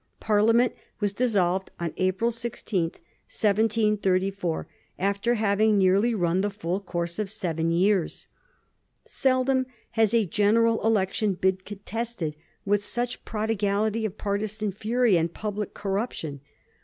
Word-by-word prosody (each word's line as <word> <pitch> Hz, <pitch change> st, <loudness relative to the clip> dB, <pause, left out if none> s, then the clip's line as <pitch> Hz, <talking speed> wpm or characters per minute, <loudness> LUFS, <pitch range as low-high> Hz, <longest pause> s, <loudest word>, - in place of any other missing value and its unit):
Parliament 225 Hz, +3 st, +3 dB, 0.3 s
was 205 Hz, -2 st, 0 dB
dis 245 Hz, +2 st, 0 dB
solved 190 Hz, -1 st, +1 dB
on 170 Hz, -2 st, -3 dB
April 190 Hz, +5 st, +1 dB
16, 230 Hz, -6 st, -2 dB
1734, 195 Hz, -1 st, 0 dB, 0.3 s
after 200 Hz, +5 st, +1 dB
having 215 Hz, 0 st, +3 dB
nearly 200 Hz, +5 st, +3 dB
run 175 Hz, -1 st, +1 dB
the 205 Hz, -, 0 dB
full 190 Hz, -2 st, -3 dB
course 170 Hz, -2 st, -4 dB
of 210 Hz, -2 st, -1 dB
seven 165 Hz, -6 st, -1 dB
years. 180 Hz, +1 st, +1 dB, 0.8 s
Seldom 260 Hz, 0 st, +1 dB, 0.2 s
has 220 Hz, -2 st, +3 dB
a 225 Hz, -2 st, +4 dB
general 225 Hz, +5 st, +2 dB
election 210 Hz, -2 st, +1 dB
been 190 Hz, +1 st, +1 dB
contested 205 Hz, -3 st, -5 dB, 0.3 s
with 205 Hz, 0 st, +2 dB
such 240 Hz, +3 st, -2 dB
a -, -, -33 dB
prodigality 215 Hz, 0 st, -1 dB
of 215 Hz, -2 st, -3 dB
partisan 210 Hz, +1 st, -2 dB
fury 220 Hz, +1 st, +2 dB
and 165 Hz, 0 st, 0 dB
public 210 Hz, -1 st, -4 dB
corruption. 195 Hz, -, -3 dB
205 Hz, 125 wpm, -26 LUFS, 190-225 Hz, 0.8 s, a